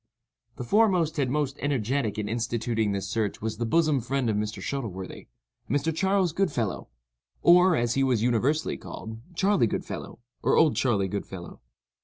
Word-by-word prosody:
The 125 - -5
foremost 180 - +2
and 135 -3 +1
most 145 0 -1
energetic 130 -5 -1
in 105 -1 -2
instituting 115 -1 -1
this 100 -1 -2
search 105 -1 -2
was 110 0 -3
the 115 0 -2
bosom 155 -1 +2
friend 130 -1 0
of - - -1
Mr. 105 +1 -2
Shuttleworthy—a 95 - -7
Mr. 145 +4 0
Charles 190 -1 +1
Goodfellow, 120 - -1 0.5
or, 180 +1 +6
as 120 -1 +1
he 135 - +2
was 125 -5 +2
universally 125 +6 +1
called, 110 0 -8 0.2
"Charley 195 - +3
Goodfellow," - - -5 0.2
or - - +2
"Old 155 -3 +5
Charley 105 -7 +1
Goodfellow." 95 -2 -6
120 Hz, 155 wpm, -27 LUFS, 110-155 Hz, 0.5 s, or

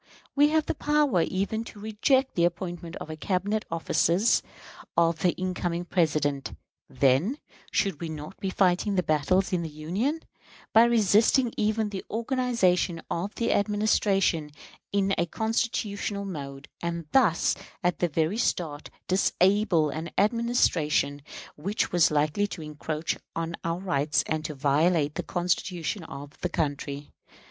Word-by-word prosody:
We 290 +1 +6
have 315 0 +2
the - - -1
power 295 - +2
even 200 +6 -1
to 210 - -11
reject 225 +6 +1
the 170 - +1
appointment 175 -1 -2
of - - -8
the 155 - -5
Cabinet 200 +6 -1
officers 170 +5 +2 0.6
of 165 -1 +3
the 180 - +2
incoming 180 -2 -2
President. 150 -6 0 0.4
Then, 140 - +2 0.3
should 195 -6 0
we 165 - -3
not 155 +3 -8
be 195 - -2
fighting 190 +2 +2
the 180 - +2
battles 175 +6 +1
in 180 - +1
the 165 - -4
Union, 190 - -2 0.5
by 225 +1 +8
resisting 230 +2 +3
even 215 0 0
the 195 -2 -5
organization 225 -8 +1
of 195 +5 -3
the 230 - +1
Administration 200 -6 +1 0.4
in 195 -1 +1
a 170 - +1
constitutional 210 -1 -2
mode, 140 -6 -7
and 170 -1 -3
thus, 215 -11 +3 0.3
at 175 0 +1
the 175 - +1
very 160 +6 0
start, 155 -10 -1 0.2
disable 185 -3 +2
an 160 +3 -5
Administration 195 - +2 0.3
which 195 +8 -2
was 175 -2 +4
likely 150 +7 +1
to 175 -5 -7
encroach 150 +1 -3 0.2
on 165 0 -2
our 165 0 -1
rights 155 -6 0
and 155 0 -2
to 150 -1 -4
violate 150 +2 +2
the - - -3
Constitution 175 +1 -2
of 145 0 -10
the 180 - -1
country? 145 -3 -3
180 Hz, 140 wpm, -27 LUFS, 155-210 Hz, 0.6 s, by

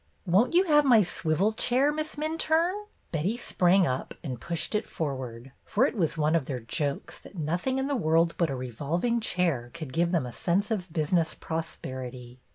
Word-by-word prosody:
"Won't 200 - +3
you 365 - +6
have 300 -5 +5
my 240 -6 +6
swivel 175 +4 0
chair. 255 +5 +2
Miss 310 +1 -3
Minturne?" 325 +6 0 0.2
Betty 175 +8 -1
sprang 185 -5 +3
up 130 -4 -3
and 125 -7 -5
pushed 170 +2 -2
it 210 +1 0
forward, 130 -4 -5
for 235 +6 +2
it - - -1
was 165 -6 0
one 155 0 +2
of 160 -5 +1
their 130 -2 -3
jokes 140 +5 -3
that 200 - -14
nothing 175 - -1
in 265 - 0
the 285 0 0
world 165 -5 +2
but 170 -3 +2
a 135 - -2
revolving 145 - -1
chair 170 - 0
could 155 -6 -7
give 170 +1 +1
them 165 -7 +1
a 120 - -7
sense 195 - 0
of 190 -5 -2
business 160 0 +1
prosperity. 130 -6 -6
170 Hz, 185 wpm, -28 LUFS, 145-230 Hz, 0.2 s, you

